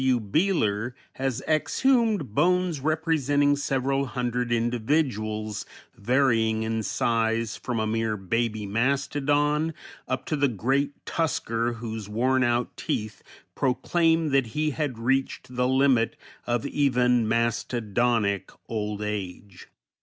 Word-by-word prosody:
W. 130 -2 +3
Beehler 115 - 0 0.2
has 135 -1 -2
exhumed 215 - +2
bones 180 +1 +2
representing 145 -2 +2
several 135 -1 0
hundred 125 0 -2
individuals, 115 -3 0 0.3
varying 115 -2 +2
in 110 0 -1
size 115 +2 0
from 120 -3 -3
a 110 - 0
mere 110 0 -1
baby 110 +2 -1
mastodon 145 +6 +1 0.3
up 130 0 -2
to 155 - -1
the 145 -1 +3
great 135 +5 -1
tusker 120 -7 -1
whose 110 -3 -6
wornout 120 +1 +1
teeth 105 0 -3 0.3
proclaim 165 +5 +1
that 135 -3 +2
he 155 0 +1
had 145 -5 -2
reached 125 +1 -1
the 125 0 +2
limit 130 -3 +3 0.3
of 120 0 0
even 125 -5 +2
mastodonic 115 -2 0 0.2
old 105 -2 -3
age. 100 -2 -6
125 Hz, 110 wpm, -26 LUFS, 110-140 Hz, 0.3 s, W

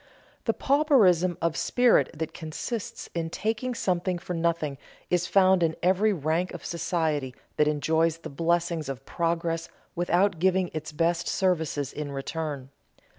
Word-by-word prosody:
The - - +2
pauperism 215 - +3
of 165 -1 +1
spirit 245 +6 +3
that 160 0 -4
consists 175 +7 -5
in 165 -1 -2
taking 225 +7 -2
something 180 -3 0
for 175 +1 -6
nothing 165 -5 -1 0.3
is 175 -1 +2
found 190 -2 +4
in 160 -1 +2
every 190 +4 +3
rank 165 +1 -1
of - - -9
society 160 -6 -1 0.2
that 150 - +4
enjoys 160 +2 +1
the 165 - -8
blessings 165 0 0
of 135 0 -6
progress 165 0 -1 0.3
without 175 +1 +2
giving 185 0 +2
its 155 -1 -5
best 165 +3 0
services 160 -7 0
in 150 -1 -5
return. 140 -1 -4
170 Hz, 140 wpm, -27 LUFS, 155-185 Hz, 0.3 s, found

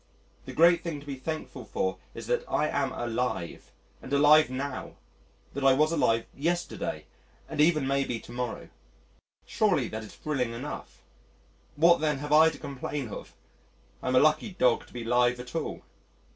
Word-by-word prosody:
The - - -7
great 170 +2 +5
thing 165 -4 -4
to 145 - -14
be 140 - -5
thankful 155 +4 -5
for - - -2 0.2
is - - -7
that - - 0
I 150 - +1
am 140 -3 -1
alive 120 -8 -3 0.3
and 130 - -10
alive 150 +1 +6
now, 130 +1 -5 0.6
that 140 - -4
I 135 -1 +6
was 155 +4 +3
alive 115 -8 +2
yesterday, 175 +5 -2 0.4
and 155 -2 -1
even 155 -3 +4
may 140 +1 +1
be 120 -3 -3
to - - -13
morrow. 125 -1 -4 0.8
Surely 185 - +1
that 110 0 -5
is 105 - -12
thrilling 130 -6 -2
enough. 130 +5 -7 0.7
What, 170 +2 +5
then, 150 -2 +1
have 145 +2 -3
I 160 +1 +7
to 160 - -9
complain 140 -1 -5
of? - - -9 0.7
I'm 130 0 0
a - - +7
lucky 155 +7 +2
dog 125 -8 +2
to - - -19
be 120 -1 -5
alive 120 +1 +2
at 125 0 -9
all. 165 -2 -4
140 Hz, 170 wpm, -28 LUFS, 125-155 Hz, 0.8 s, I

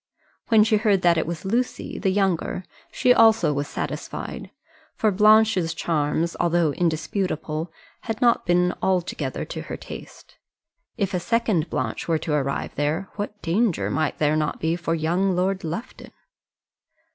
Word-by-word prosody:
When 220 -2 +6
she 220 0 +3
heard 205 -3 +2
that 170 -2 +4
it 155 - -2
was 170 +2 -5
Lucy, 240 +6 -2
the 195 - +1
younger, 190 -2 0 0.3
she 250 - +4
also 225 -9 +5
was 145 0 -2
satisfied; - - -5 0.5
for 215 - +2
Blanche's 210 -4 +4
charms, 160 +1 -1
though 170 -2 +2
indisputable, 160 0 -2 0.3
had 225 -2 -3
not 240 -1 +3
been 180 0 +2
altogether 185 -2 -1
to - - -6
her - - -6
taste. - - -11 0.6
If 200 -3 -1
a 180 - +1
second 210 -4 0
Blanche - - -3
were 165 -1 +2
to 155 0 -3
arrive 140 -2 -1
there 155 +7 -1
what 210 0 -5
danger 190 +3 +1
might 155 0 -1
there 150 0 +2
not 155 -1 -1
be 160 +1 0
for 170 -1 -1
young 175 +4 +1
Lord 185 +1 0
Lufton! 170 +10 -6
180 Hz, 150 wpm, -24 LUFS, 160-210 Hz, 0.6 s, When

